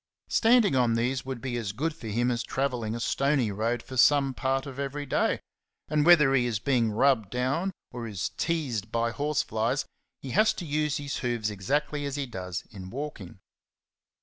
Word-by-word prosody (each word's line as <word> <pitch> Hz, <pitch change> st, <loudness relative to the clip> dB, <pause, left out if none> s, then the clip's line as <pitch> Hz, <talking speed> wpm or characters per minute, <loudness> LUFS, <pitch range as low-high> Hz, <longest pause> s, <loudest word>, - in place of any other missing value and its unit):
Standing 225 Hz, -, +4 dB
on 120 Hz, -3 st, +3 dB
these 125 Hz, +2 st, 0 dB
would 130 Hz, -3 st, -5 dB
be 130 Hz, -2 st, -3 dB
as 105 Hz, -4 st, -3 dB
good 150 Hz, +7 st, -2 dB
for 120 Hz, -, -9 dB
him 120 Hz, +4 st, +1 dB
as 120 Hz, 0 st, -1 dB
travelling 120 Hz, -3 st, -2 dB
a -, -, -4 dB
stony 135 Hz, -2 st, +1 dB
road 115 Hz, +4 st, -1 dB
for 130 Hz, -, -8 dB
some 135 Hz, +2 st, +5 dB
part 135 Hz, +1 st, -1 dB
of 140 Hz, -1 st, -8 dB
every 140 Hz, +1 st, -3 dB
day; 130 Hz, -, +1 dB, 0.5 s
and 150 Hz, +1 st, +2 dB
whether 150 Hz, -6 st, +7 dB
he 125 Hz, -2 st, +3 dB
is 115 Hz, -3 st, 0 dB
being 120 Hz, 0 st, +1 dB
rubbed 110 Hz, -1 st, +2 dB
down 135 Hz, -, 0 dB, 0.2 s
or 120 Hz, -1 st, -5 dB
is 100 Hz, -5 st, -3 dB
teased 125 Hz, -, -2 dB
by 115 Hz, 0 st, 0 dB
horseflies, 135 Hz, -3 st, 0 dB, 0.3 s
he 135 Hz, -, -7 dB
has 215 Hz, -, +4 dB
to 175 Hz, -, -6 dB
use 150 Hz, 0 st, 0 dB
his 145 Hz, -1 st, -4 dB
hoofs 120 Hz, -4 st, -1 dB
exactly 145 Hz, +9 st, -1 dB
as 140 Hz, -, -4 dB
he 145 Hz, -1 st, -2 dB
does 95 Hz, -7 st, -5 dB
in 95 Hz, -3 st, -9 dB
walking. 130 Hz, -8 st, -6 dB
130 Hz, 185 wpm, -28 LUFS, 115-145 Hz, 0.5 s, whether